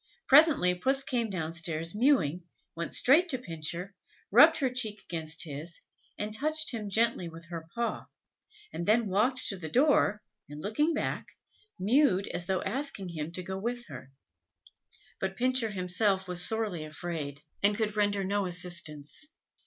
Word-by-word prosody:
Presently 280 - +6
Puss 265 +10 +1
came 240 -4 -1
down 165 -4 -3
stairs 165 -1 -3
mewing, 205 - +2 0.3
went 170 0 -4
straight 320 +8 +4
to 265 - 0
Pincher, 170 -2 -5 0.4
rubbed 310 - +8
her 270 -4 0
cheek 220 -5 -2
against 160 -1 -2
his, 155 +2 -7 0.4
and 210 +1 -4
touched 310 +6 0
him 215 -4 -4
gently 220 -4 +1
with 165 +1 -12
her 165 -2 -6
paw, 235 0 -2 0.7
and 170 - -4
then 225 +2 +4
walked 245 +7 +1
to 195 - -3
the 160 -3 -6
door, 245 - +3 0.3
and, 145 0 -8
looking 295 - +1
back, - - -2 0.5
mewed, 205 -1 +3
as 175 - -4
though 190 -1 0
asking 225 -4 -3
him 155 -2 -4
go 185 +2 -5
with 240 +3 -3
her. 130 - -10 1.1
But 190 0 -3
Pincher 255 -1 +2
was 210 - -7
himself 190 +1 +1
sorely 180 -2 -1
afraid, 155 -2 -5 0.2
and 205 +1 +3
could 215 -2 -1
render 205 -1 +1
no 200 0 0
assistance. 175 - -1
200 Hz, 155 wpm, -30 LUFS, 170-240 Hz, 1.1 s, rubbed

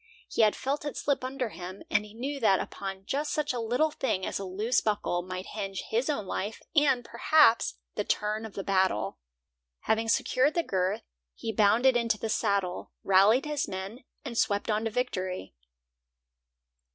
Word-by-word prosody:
He - - +1
had 215 -1 +5
felt 280 +3 -2
it 290 - -4
slip 280 -3 0
under 255 -2 -2
him, 185 0 -8
and 210 - +3
he 210 0 -13
knew 275 +4 -3
that 195 -6 +4
upon 195 -1 -6
just 290 +7 -1
such 300 -2 0
a 245 - -2
little 245 +8 +1
thing 190 -10 -1
as - - -2
a - - -4
loose 210 +7 +1
buckle 205 -4 0
might 185 +1 -6
hinge 195 -3 -4
his 240 +6 +1
own 250 -9 -1
life, 205 +3 -3 0.2
and, 275 -5 +4
perhaps, 235 - +4 0.2
the - - -1
turn 210 +1 -1
of 220 -2 -8
the 195 - -3
battle. 185 - +1 0.6
Having 225 +1 +1
secured 260 +5 +2
the 340 - +2
girth, 190 - -1 0.3
he 225 - -4
bounded 230 +5 +4
into 230 -2 +2
the 220 - -4
saddle, 195 -4 0
rallied 200 +7 +5
his 300 -1 -1
men, 195 +7 -6 0.2
and 235 -4 -2
swept 205 +2 +1
on 215 +1 0
to - - +1
victory. 185 - -3
220 Hz, 175 wpm, -29 LUFS, 195-255 Hz, 0.6 s, had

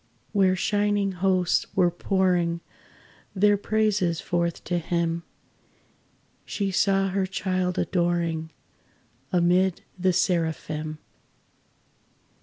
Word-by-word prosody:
Where 190 -3 +3
shining 205 +1 +1
hosts 185 -1 +1
were 180 -2 +4
pouring 175 -2 +1 0.7
Their 205 +2 +4
praises 205 -5 +1
forth 170 -1 -2
to 175 0 -1
Him, 170 0 -1 1.2
She 200 -2 -2
saw 195 +1 +2
her 190 0 0
child 185 -1 -1
adoring, 170 -3 0 0.8
Amid 180 +1 +2 0.2
the 185 +1 +3
Seraphim. 160 -3 -1
180 Hz, 85 wpm, -25 LUFS, 170-195 Hz, 1.2 s, were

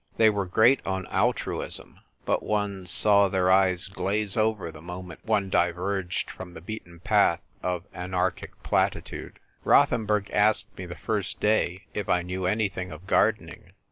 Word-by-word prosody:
They 110 -1 +6
were 100 -2 -2
great 110 +8 +4
on 95 -1 -3
altruism; - - -1 0.3
but - - +1
one 100 -3 -2
saw 100 +1 +5
their 95 -1 +1
eyes 95 -1 +3
glaze 100 +1 -1
over 110 -6 0
the 80 -1 -12
moment 90 +1 -9
one 100 -4 0
diverged 90 +1 -1
from 90 -1 -10
the - - -7
beaten 85 -2 -9
path 100 -4 +3 0.2
of 90 -1 -2
anarchic 90 0 -3
platitude. - - -1 0.3
Rothenburg 105 -2 +3
asked 105 0 +2
me 90 - -7
the 90 - -7
first 105 -4 -2
day 105 -3 +1
if 105 -2 -4
I 90 -1 +2
knew 90 +1 -3
anything 95 -3 -1
of 80 +3 -10
gardening. - - 0
95 Hz, 150 wpm, -26 LUFS, 90-105 Hz, 0.3 s, They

